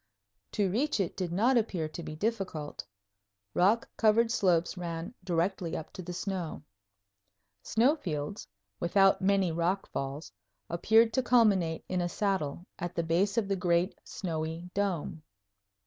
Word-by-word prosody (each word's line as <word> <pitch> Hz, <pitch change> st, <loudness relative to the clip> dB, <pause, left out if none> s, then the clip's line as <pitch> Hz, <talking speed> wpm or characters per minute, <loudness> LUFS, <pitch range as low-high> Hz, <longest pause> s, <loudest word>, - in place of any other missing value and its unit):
To 205 Hz, -2 st, +2 dB
reach 265 Hz, +4 st, 0 dB
it 190 Hz, -4 st, -1 dB
did 180 Hz, -3 st, -3 dB
not 235 Hz, +8 st, +3 dB
appear 180 Hz, -8 st, -2 dB
to 170 Hz, -, -7 dB
be 155 Hz, -1 st, -6 dB
difficult. 185 Hz, -6 st, -3 dB, 0.7 s
Rock 205 Hz, +6 st, +3 dB
covered 225 Hz, +1 st, +4 dB
slopes 175 Hz, -6 st, +2 dB
ran 170 Hz, +3 st, -5 dB
directly 175 Hz, -1 st, -1 dB
up 155 Hz, -, -8 dB
to -, -, -7 dB
the 180 Hz, 0 st, -6 dB
snow. 180 Hz, -4 st, -4 dB, 1.0 s
Snow 245 Hz, -, +3 dB
fields, 165 Hz, -, -4 dB, 0.3 s
without 195 Hz, +2 st, +4 dB
many 195 Hz, -2 st, +3 dB
rock 170 Hz, +4 st, 0 dB
falls, 135 Hz, 0 st, -4 dB, 0.4 s
appeared 225 Hz, +6 st, +4 dB
to 260 Hz, -, +2 dB
culminate 200 Hz, -10 st, +3 dB
in 185 Hz, -1 st, -1 dB
a 175 Hz, -, -1 dB
saddle 180 Hz, -5 st, -1 dB
at 175 Hz, 0 st, -4 dB
the 170 Hz, -, 0 dB
base 185 Hz, +7 st, +1 dB
of 220 Hz, -4 st, +2 dB
the 195 Hz, -, +1 dB
great 180 Hz, 0 st, +1 dB
snowy 165 Hz, 0 st, -4 dB
dome. 185 Hz, -6 st, -1 dB
185 Hz, 145 wpm, -30 LUFS, 165-205 Hz, 1.0 s, covered